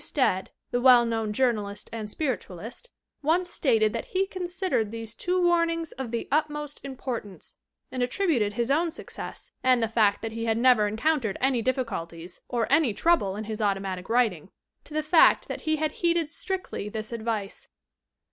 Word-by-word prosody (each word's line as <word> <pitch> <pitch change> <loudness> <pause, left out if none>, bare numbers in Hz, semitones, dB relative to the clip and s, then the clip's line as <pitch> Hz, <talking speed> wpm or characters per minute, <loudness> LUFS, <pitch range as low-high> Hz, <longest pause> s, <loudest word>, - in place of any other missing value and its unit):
T. - - -4
Stead, 190 -10 +1 0.2
the 245 - 0
well 245 -2 +7
known 225 -2 -1
journalist 210 -4 0
and 220 -2 -4
spiritualist, 240 - -4 0.3
once 345 +4 +1
stated 220 -6 +2
that 230 - -3
he 380 +1 0
considered 360 - -1
these 225 0 -6
two 360 +9 -1
warnings 335 -2 +2
of 265 -2 -6
the 235 0 -3
utmost 295 -1 -1
importance, 250 -7 -6 0.3
and 255 - -3
attributed 245 - +1
his 235 +3 -1
own 330 +4 +2
success 330 - -8
(and 255 -2 +4
the - - +2
fact 215 -2 +2
that 225 - -3
he 230 +1 -4
had 225 -1 +1
never 240 -3 +5
en 210 +1 -4
countered 260 -6 +1
any 260 -2 +2
difficulties 185 -9 -3
or 235 -2 0
any 265 -10 +4
trouble 325 - +2
in 215 - -4
his 220 0 -5
automatic 195 -2 -1
writing) 220 -8 +1 0.4
to 300 - -10
the 310 - +1
fact 315 +2 +5
that - - -5
he 315 - +4
had 310 0 -1
heeded 335 -2 0
strictly 370 - -3
this 215 +1 -5
advice. 220 -3 -3
240 Hz, 175 wpm, -27 LUFS, 215-310 Hz, 0.4 s, well